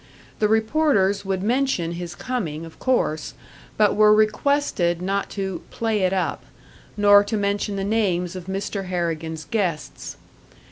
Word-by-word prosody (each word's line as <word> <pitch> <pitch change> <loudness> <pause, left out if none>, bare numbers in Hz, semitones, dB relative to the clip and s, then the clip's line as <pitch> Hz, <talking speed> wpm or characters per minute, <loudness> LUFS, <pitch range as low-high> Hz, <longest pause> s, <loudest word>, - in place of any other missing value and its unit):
The 210 - +3
reporters 220 -3 +2
would 190 -1 -2
mention 240 -7 0
his 175 0 -6
coming, 175 - -4
of 165 - -14
course, 160 - 0 0.4
but 210 -2 +3
were 210 0 +6
requested 215 - +1
not 195 +2 -2
to 190 -2 -3
"play 225 -2 -1
it 185 -1 +2
up," 190 -1 -1 0.5
nor 205 0 +6
to 215 +2 -2
mention 200 0 -1
the 195 - -2
names 190 -4 0
of 180 -1 -8
Mr. 195 +1 -3
Harrigan's 165 -3 -3
guests. 185 -9 -3
195 Hz, 140 wpm, -23 LUFS, 175-215 Hz, 0.5 s, were